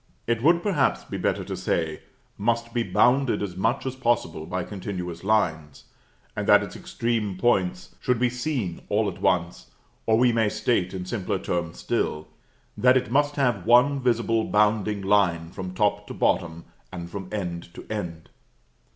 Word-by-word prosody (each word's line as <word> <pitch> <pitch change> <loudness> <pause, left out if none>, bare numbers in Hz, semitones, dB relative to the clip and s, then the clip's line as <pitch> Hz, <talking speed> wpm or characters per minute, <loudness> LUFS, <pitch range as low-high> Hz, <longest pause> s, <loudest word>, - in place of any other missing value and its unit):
It 115 -1 0
would, 170 +5 +4
perhaps, 170 -10 +1
be - - -6
better - - 0
to - - -4
say, 80 -2 -2 0.3
must 115 +2 -1
be 120 - +1
bounded 125 -1 +2
as 90 -3 -5
much 115 +9 0
as 130 -1 -3
possible 115 -11 -1
by 90 0 -2
continuous 90 -4 -6
lines, 80 -9 0 0.5
and - - -3
that - - +6
its - - -8
extreme 110 -5 -2
points 95 -5 0
should 125 -1 +1
be 125 +2 +2
seen 125 - -3
all 105 +1 +2
at 95 - -5
once; 85 -8 0 0.4
or 110 -1 +4
we 125 +1 +4
may 115 -2 +2
state, 95 -5 0
in 90 -1 -4
simpler 100 0 -2
terms 85 -2 -3
still, 75 0 -2 0.5
that 125 +1 +5
it 125 - -2
must 145 +2 +2
have 120 -10 0
one 130 +4 +5
visible 115 -3 +1
bounding 105 -1 +1
line 90 -5 +2
from 95 -1 -6
top 105 +1 +1
to - - -7
bottom, 85 0 0 0.3
and 85 -2 -7
from 95 -1 -6
end 85 -5 -4
to - - -10
end. 85 -7 -5
105 Hz, 170 wpm, -25 LUFS, 90-120 Hz, 0.5 s, that